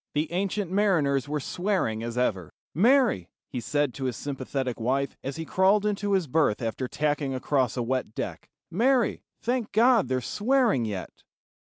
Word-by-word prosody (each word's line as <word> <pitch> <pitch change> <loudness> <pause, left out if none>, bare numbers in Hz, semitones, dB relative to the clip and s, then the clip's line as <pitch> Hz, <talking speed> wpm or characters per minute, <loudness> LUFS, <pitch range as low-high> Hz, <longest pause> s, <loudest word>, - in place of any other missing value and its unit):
The 150 +2 0
ancient 195 +1 -1
mariners 150 -9 +2
were 150 0 -1
swearing 175 - -1
as 115 +1 -5
ever. 95 -9 0 0.2
"Mary," 235 - +3 0.2
he 125 - -3
said 145 +3 0
to 135 - -5
his 125 - -2
sympathetic 135 -3 -3
wife, 135 +4 0
as 135 +1 -4
he 165 0 -5
crawled 195 +5 +3
into 205 -1 0
his 190 -3 +2
berth 145 -6 +2
after 120 +2 -3
tacking 145 -1 -1
across 130 -2 0
a 120 - 0
wet 125 -2 -2
deck, - - -5 0.2
"Mary, 240 +4 +2 0.2
thank 245 -2 -1
God 230 - +4
they're 130 0 0
swearing 220 - +1
yet." 100 -4 -6
145 Hz, 165 wpm, -27 LUFS, 125-200 Hz, 0.2 s, God